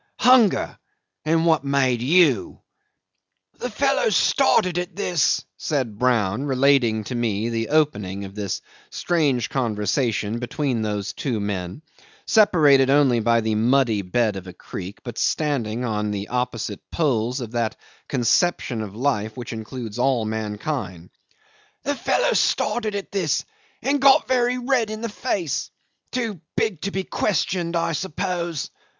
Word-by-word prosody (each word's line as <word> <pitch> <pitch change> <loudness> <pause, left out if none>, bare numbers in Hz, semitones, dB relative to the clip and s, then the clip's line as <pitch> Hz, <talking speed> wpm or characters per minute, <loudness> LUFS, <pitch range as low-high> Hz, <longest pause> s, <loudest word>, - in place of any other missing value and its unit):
Hunger. 245 -5 +4 0.5
And 165 +1 +2
what 160 -4 +3
made 135 -4 +1
you?" 145 - +3 1.0
'"The 245 - -3
fellow 275 +2 +1
started 185 -5 +3
at 180 +2 -5
this," 175 -7 +1
said 130 -9 -2
Brown, 120 -1 +1
relating 130 -5 +3
to 125 - -6
me 115 -2 -1
the 115 -1 -2
opening 105 -11 0
of 95 - -10
this 100 -2 -3 0.3
strange 145 -9 0
conversation 115 -2 -1
between 130 -1 -2
those 105 -2 -3
two 125 -6 -2
men, 100 - -4 0.4
separated 155 - +5
only 135 -4 +4
by 115 +1 +2
the 110 0 -1
muddy 115 -1 +2
bed 105 +2 0
of 95 -1 -8
a 90 - -8
creek, 95 +2 -8
but 120 -3 -6
standing 125 -6 0
on 105 -2 -1
the 100 0 -4
opposite 120 -4 -3
poles 125 -5 0
of 120 -3 -6
that 115 -2 -1 0.3
conception 125 -1 +1
of 105 -2 -7
life 110 -4 -1
which 120 -1 -6
includes 115 0 -6
all 125 -3 +2
mankind 105 - -4 0.7
"The 285 - 0
fellow 280 - +1
started 215 -3 +1
at 200 - -5
this 175 -8 0 0.4
and 280 0 +1
got 275 -1 +6
very 250 -1 +2
red 250 -3 +1
in 215 0 -5
the 230 - -3
face. 200 - -2 0.4
Too 225 -9 -3 0.2
big 215 -8 0
to 200 - -2
be 190 0 -2
questioned, 175 -3 -1
I 170 0 0
suppose. 170 -1 -3
130 Hz, 140 wpm, -23 LUFS, 110-170 Hz, 1.0 s, got